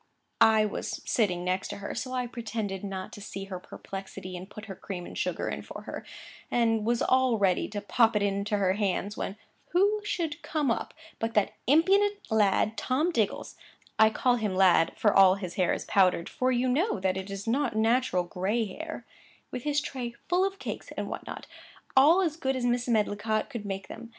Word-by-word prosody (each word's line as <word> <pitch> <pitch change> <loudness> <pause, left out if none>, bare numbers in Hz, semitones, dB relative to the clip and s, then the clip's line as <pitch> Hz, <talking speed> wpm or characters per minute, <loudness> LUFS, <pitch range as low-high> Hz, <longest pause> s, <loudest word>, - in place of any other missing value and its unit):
I 220 -1 +6
was 210 - -4
sitting 180 -6 +1
next 185 +1 -1
to 205 - -6
her, 200 0 -5
so 255 +1 -4
I 250 -1 -1
pretended 220 -5 -4
not 190 -2 -5
to 205 - -9
see 195 -1 -6
her 190 -2 -6
perplexity, 190 0 -8
and 180 +2 -8
put 215 +1 -9
her 200 - -7
cream 180 -2 -6
and - - -9
sugar - - -2
in - - -3
for - - -9
her, - - -7 0.5
and 225 -2 +1
was 240 0 +2
all 260 -2 +3
ready 190 -3 +2
to 205 -1 -5
pop 225 +2 +3
it 210 - +2
into 200 +1 0
her 190 -2 +2
hands,—when 200 0 -2 0.4
who 405 +4 +3
should 330 -7 -2
come 295 -5 0
up, - - -3 0.2
but 225 0 -2
that 210 -2 +2
impudent 390 +8 +4
lad 215 0 +2
Tom 300 +7 +1
Diggles 220 - -1 0.4
(I 220 0 +7
call 245 +3 +2
him 210 -5 -1
lad, 185 -3 +4
for 210 - +3
all 190 -1 +7
his 185 -3 -6
hair 180 -1 +1
is - - -2
powdered, 185 -3 +3
for 255 0 0
you 250 +1 +1
know 280 - +1
that 185 0 0
it 190 +1 -5
is 195 0 -5
not 250 0 +1
natural 225 -3 +2
gray 195 +6 -1
hair), 320 +11 -7 0.5
with 250 +1 -5
his 295 -1 +2
tray 250 -5 -5
full 360 +2 +3
of 390 0 -1
cakes - - -6
and - - -3
what - - -6
not, - - -7 0.5
all 305 +8 +7
as 320 -3 -1
good 265 -4 -1
as 250 -1 -1
Mrs. 245 0 +1
Medlicott 215 -1 0
could 210 -4 -5
make 195 -1 -4
them. 230 0 -9
220 Hz, 200 wpm, -28 LUFS, 195-255 Hz, 0.5 s, I